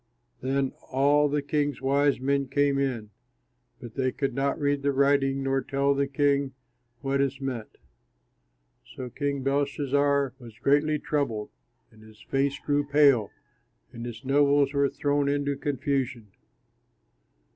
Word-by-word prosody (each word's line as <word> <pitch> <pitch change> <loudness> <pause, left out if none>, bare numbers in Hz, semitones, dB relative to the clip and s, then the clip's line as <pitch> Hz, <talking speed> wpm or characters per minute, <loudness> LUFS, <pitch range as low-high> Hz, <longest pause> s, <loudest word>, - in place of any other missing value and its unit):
Then 135 0 0 0.2
all 145 +2 +3
the 145 0 -1
king's 145 -2 -1
wise 140 +1 +2
men 140 +1 0
came 140 +1 +1
in, 120 -6 -2 0.7
but 120 -4 -10
they 130 -1 0
could 135 -1 -2
not 135 +2 -1
read 145 -1 0
the 140 0 +1
writing 135 0 +2
nor 135 0 +1
tell 140 +2 +1
the 140 0 0
king 140 -1 +1 0.5
what 135 0 0
it 135 -1 -1
meant. 130 -5 -5 1.2
So 125 -1 -6
King 140 +1 -2
Belshazzar 140 -1 +1
was 115 -4 -13
greatly 145 +5 +2
troubled, 140 -9 -2 0.4
and 110 - -19
his 110 0 -17
face 135 +4 -1
grew 145 0 0
pale, 140 -7 +4 0.6
and 115 -1 -7
his 120 +2 -8
nobles 140 0 +3
were 140 -1 +2
thrown 145 0 0
into 145 0 0
confusion. 135 - -2
140 Hz, 135 wpm, -27 LUFS, 130-145 Hz, 1.2 s, pale